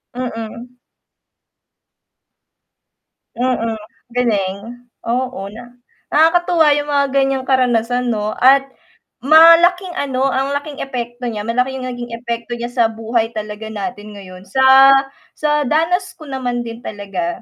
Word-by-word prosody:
Mm. 240 0 -7 2.6
Mm, 240 -2 -1 0.4
galing, 200 -6 0 0.4
oo. 250 -1 -2
Na 240 +3 -12 0.3
nakakatuwa 330 +1 +3
yung 290 0 -3
mga 285 -1 +2
ganyang 270 -1 +1
karanasan 250 -2 +1
'no 215 -2 -1
at 270 +2 +6 0.6
malaking 335 +5 +6
ano, 270 -2 0
ang 270 +1 -1
laking 290 0 -5
epekto 245 -2 -5
niya, 215 -3 -4
malaki 250 +4 -1
yung 255 -1 -5
naging 245 -1 -7
epekto 235 0 -5
niya 240 0 -5
sa 240 -2 +2
buhay 225 +1 -2
talaga 215 0 -6
natin 215 0 -6
ngayon, 185 -2 -12
sa 265 +4 +6 0.4
sa 300 -1 0
danas 345 +6 0
ko 310 -4 -12
naman 250 -2 -3
din 230 0 -8
talaga, 195 -5 -5
250 Hz, 120 wpm, -17 LUFS, 225-275 Hz, 2.6 s, at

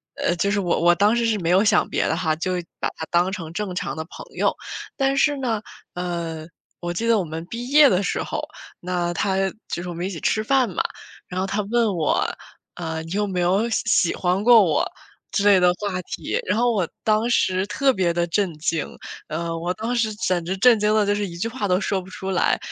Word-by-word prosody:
呃， 175 - 0
就 200 +3 0
是 205 - +1
我 175 -3 0
我 175 0 +6
当 205 +5 +3
时 235 - +1
是 220 -2 +1
没 170 -1 -1
有 190 +3 +5
想 210 - +3
别 - - 0
的 - - +1
哈， 160 -3 0
就 185 +3 -2 0.3
把 - - 0
他 160 - -5
当 175 +2 +2
成 165 -5 -6
正 200 -2 -3
常 145 -5 -3
的 160 - -3
朋 - - -11
友。 - - +2 0.4
但 270 -1 +1
是 290 0 +3
呢， 230 -5 -1 0.3
呃， 170 -3 -4 0.3
我 175 0 -3
记 230 +6 -2
得 230 -1 +4
我 190 - 0
们 160 +1 -6
毕 240 +2 -5
业 290 0 +7
的 185 +1 +2
时 - - -1
候， - - -3 0.4
那 175 -1 -2
他， 190 +1 0 0.3
就 175 - -4
是 180 - -5
我 175 - -4
们 175 +2 -4
一 190 - -2
起 170 - -6
吃 215 - +1
饭 260 -1 +2
嘛， 180 - -1 0.4
然 185 - -4
后 190 - 0
他 200 +2 -1
问 235 0 +3
我， 155 -3 +1 0.5
呃， 160 -2 -4
你 165 - -10
有 205 +2 0
没 185 -2 -1
有 195 +6 +2
喜 225 - 0
喜 170 - +3
欢 180 +1 0
过 235 -1 +8
我， 155 -5 +1 0.4
之 200 - 0
类 200 -2 +7
的 180 0 +4
话 195 -3 -2
题。 - - -3
然 205 +4 0
后 240 0 +3
我 190 -7 0 0.2
当 215 +1 +2
时 185 -4 +2
特 275 +5 +2
别 185 -7 +1
的 175 0 +1
震 185 0 0
惊， 160 0 -1 0.4
呃， 165 +1 -3
我 175 +2 -2
当 225 +5 -3
时 220 -2 +1
简 180 -4 -1
直 190 +2 -2
震 235 0 +6
惊 210 +1 +2
得 215 -1 +3
就 205 - +2
是 205 -1 -2
一 170 - -9
句 205 - -1
话 225 -4 -3
都 180 0 +2
说 195 0 0
不 180 - -14
出 190 +1 -6
来。 185 - +2
190 Hz, 260 characters per minute, -23 LUFS, 175-215 Hz, 0.5 s, 过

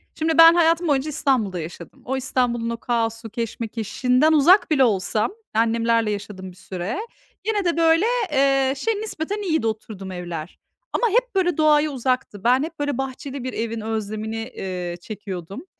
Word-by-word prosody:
Şimdi 320 0 0
ben 330 0 +10
hayatım 335 0 +3
boyunca 285 0 +1
İstanbul'da 255 - 0
yaşadım. 170 +1 -9
O 265 +2 -1
İstanbul'un 245 -3 0
o 235 - -3
kaosu 225 -1 -2
keşmekeşinden 235 +5 0
uzak 330 +6 +5
bile 275 -3 +5
olsam, 215 - +1 0.2
annemlerle 230 0 +2
yaşadım 200 -2 -6
bir - - -17
süre, 185 - -5 0.4
gene 415 -2 0
de, 340 -1 +1
böyle, 330 +3 +4 0.3
eee, 270 -1 +3
şey, 450 +11 0
nispeten 410 -1 -4
iyiydi 320 - 0
oturduğum 215 -3 -5
evler. 175 -2 -6 0.3
Ama 475 - +2
hep, 485 +2 +1
böyle, 355 -4 +1
doğaya 305 -1 +4
uzaktı. 255 -6 -2
Ben 250 +3 +4
hep, 325 0 -7
böyle, 290 -3 -1
bahçeli 270 0 -5
bir 255 - -4
evin 230 0 -3
özlemini, 220 0 -3 0.2
eee, 180 -2 -4
çekiyordum. 195 - -7
250 Hz, 155 wpm, -22 LUFS, 215-310 Hz, 0.4 s, ben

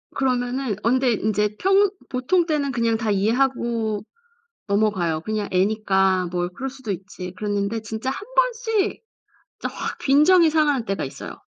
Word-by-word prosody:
그러면은 250 -2 0
언제 255 +2 +3
인제 210 0 0
평 390 - +4 0.2
보통 300 +8 +1
때는 295 -4 0
그냥 230 -2 +1
다 220 -1 -1
이해하고 225 0 0 0.6
넘어가요. 200 -6 +1
그냥 215 +2 -2
애니까 190 -1 +2
뭐 175 0 -1
그럴 265 +9 -5
수도 260 -5 -6
있지. 185 -1 -6
그랬는데 205 +1 -2
진짜 220 +3 -4
1 395 +10 -5
번씩 460 -4 +1 0.6
진짜 - - -5
확 - - -4
빈정이 315 +5 +5
상하는 295 -5 +2
때가 195 -5 -2
있어요. 135 - -8
230 Hz, 305 characters per minute, -23 LUFS, 200-275 Hz, 0.6 s, 빈정이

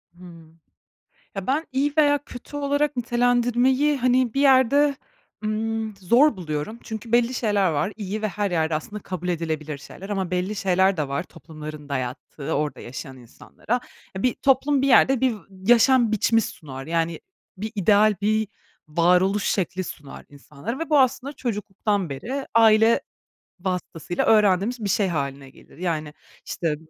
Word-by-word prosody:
Hıı, 170 -3 -14 0.8
ya 195 -1 -5
ben 295 +5 0
iyi 280 +3 +1
veya 290 -1 +4
kötü 255 +4 -10
olarak 285 0 0
nitelendirmeyi, 245 +4 +2
hani, 255 -1 +2
bir 275 - +1
yerde, 275 +1 +4 0.5
ımm, 220 0 -2
zor 235 - +4
buluyorum 165 +5 -4
çünkü 220 +1 -7
belli 240 +1 +3
şeyler 205 -6 +1
var. 160 +7 -1
İyi 210 0 -4
ve 215 - +1
her 200 +1 -2
yerde 160 -2 0
aslında 205 +7 -5
kabul 180 -1 -5
edilebilir 155 -3 -3
şeyler 190 +7 -11
ama 190 -3 -2
belli 185 +3 -1
şeyler 190 0 +2
de 150 -3 -2
var, 140 +1 -2
toplumların 155 -4 -10
dayattığı 140 +3 -5
orada 145 -2 -2
yaşayan 130 +2 -8
insanlara. 130 - -5 0.3
Ya 190 - -4
bir 250 - +2
toplum 270 +1 +2
bir - - +2
yerde 265 -1 +5
bir 255 -3 +2
v - - -10
yaşam 230 +4 +4
biçimi 225 +2 +3
sunar, 135 -9 -7
yani, 165 0 -1 0.4
bir 215 +3 -5
ideal 210 +2 +4
bir 215 0 +1 0.4
varoluş 180 +5 +2
şekli 185 -1 -1
sunar 145 -3 -9
insanlara 145 - -7
ve 330 -1 -5
bu 295 - +5
aslında 265 +1 +1
çocukluktan 205 - -2
beri 250 - -4
aile 225 0 +5 0.6
vasıtasıyla 175 -2 -3
öğrendiğimiz 215 +2 +3
bir 200 - -1
şey 205 -1 +2
hâline 140 -5 -3
gelir. - - -19
Yani 155 -4 -3 0.3
işte 165 -3 -2
205 Hz, 150 wpm, -23 LUFS, 165-245 Hz, 0.8 s, yerde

